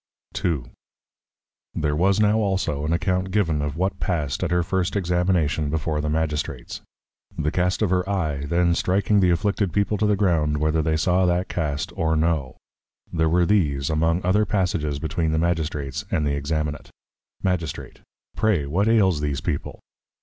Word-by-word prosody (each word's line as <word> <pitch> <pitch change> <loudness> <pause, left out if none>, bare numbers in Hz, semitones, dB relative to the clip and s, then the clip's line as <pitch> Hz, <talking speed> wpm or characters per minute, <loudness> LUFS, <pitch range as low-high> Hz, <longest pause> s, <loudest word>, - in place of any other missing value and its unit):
II. 80 -8 0 1.1
There 75 -1 0
was 95 +5 +2
now 105 +1 +3
also 95 -8 -1
an 80 - -1
account 90 +1 0
given 90 -7 +1
of 75 +1 -3
what 95 +1 -1
passed 75 -8 -1
at - - 0
her 90 0 +2
first 90 +2 -1
Examination 90 -5 +1
before 80 0 -1
the 75 - -2
Magistrates. 75 -1 -3 0.6
The 75 - 0
Cast 90 +4 0
of 100 - +1
her 90 +1 +1
Eye, 75 -8 -1
then 85 +2 +2
striking 100 +4 +2
the 90 -2 +4
afflicted 100 +2 +1
People 100 +3 0
to 105 - +2
the 105 - +3
Ground, 80 -7 +1
whether 80 +1 +1
they 80 0 0
saw 90 +3 +2
that 90 +1 0
Cast 75 -4 -2
or 80 -1 +1
no; 80 -4 0 0.6
there 80 -1 +2
were 85 +2 +3
these 75 -8 +1
among 80 +3 +1
other 100 +4 +3
Passages 90 -7 -1
between 80 +1 -1
the - - +1
Magistrates 80 -5 -1
and 75 - 0
the 70 - +1
Examinate. 75 +1 -3 0.5
Magistrate. 85 -6 -3 0.3
Pray, 105 -10 +1
what 90 +9 0
ails 95 -9 +3
these 70 -2 -1
People? - - -3
85 Hz, 165 wpm, -23 LUFS, 75-95 Hz, 1.1 s, the